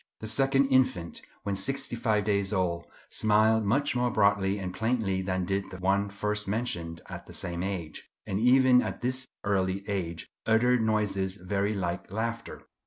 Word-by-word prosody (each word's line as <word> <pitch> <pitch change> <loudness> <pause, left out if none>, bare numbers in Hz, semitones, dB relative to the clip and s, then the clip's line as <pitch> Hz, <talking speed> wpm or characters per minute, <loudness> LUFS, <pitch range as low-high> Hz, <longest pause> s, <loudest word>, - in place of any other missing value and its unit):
The - - -7
second 135 +4 +3
infant, 130 -10 +1 0.2
when 100 -1 -1
sixty 135 +4 -1
five 110 -3 +1
days 100 -1 +1
old, 90 -4 -1 0.2
smiled 110 +1 +3
much 135 +7 +1
more 125 0 +2
broadly 100 -2 +2
and 95 -2 -4
plainly 110 -5 0
than 95 -1 -1
did 95 +2 -2
the 95 - -8
one 100 +2 +1
first 105 +1 -3
mentioned 85 -7 -3
at - - -8
the - - -11
same 85 0 -4
age; 90 -5 -4 0.2
and 95 - -2
even 125 +1 +6
at - - -4
this 130 +1 -1 0.2
early 95 0 0
age 85 -5 -3 0.2
uttered 120 +2 +4
noises 100 -4 0
very 100 +2 -1
like 90 -2 -3
laughter. 115 +3 -4
100 Hz, 165 wpm, -28 LUFS, 95-115 Hz, 0.2 s, even